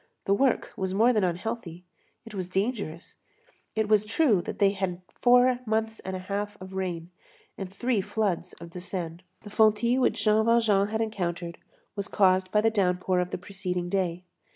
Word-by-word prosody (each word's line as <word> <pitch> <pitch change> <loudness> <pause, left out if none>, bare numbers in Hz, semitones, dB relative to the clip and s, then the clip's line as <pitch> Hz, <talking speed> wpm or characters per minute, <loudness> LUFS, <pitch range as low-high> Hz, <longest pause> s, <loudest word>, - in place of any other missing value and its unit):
The 195 - +3
work 260 +4 +1
was 190 -1 -2
more 235 +4 +5
than 215 -3 +2
unhealthy; 180 -1 -3 0.4
it 225 - -11
was 185 -3 -4
dangerous. 195 -4 -3 0.5
It 220 -1 0
is 210 -1 +5
true 220 - +2
that - - -6
they 200 -1 +4
had 185 -2 -3 0.2
four 245 0 +5
months 220 0 -1
and 190 0 -5
a 185 0 -7
half 205 +1 -3
of 185 0 -10
rain, 180 -3 -4 0.4
and 190 -2 -6
three 235 +1 0
floods 205 -2 -2
of 170 0 -11
the 180 - -7
Seine. 175 -2 -5 0.2
The 205 - -11
fontis 220 +4 +3
which 250 - +1
Jean 215 0 +4
Valjean 220 -4 +3
had 220 +1 -2
encountered 175 -6 -3 0.4
was 200 -1 -3
caused 185 -3 +3
by 210 - +4
the 225 +1 +3
downpour 185 -3 +1
of 180 0 -1
the - - -3
preceding 180 -1 -4
day. 180 -2 -1
200 Hz, 180 wpm, -27 LUFS, 180-220 Hz, 0.5 s, more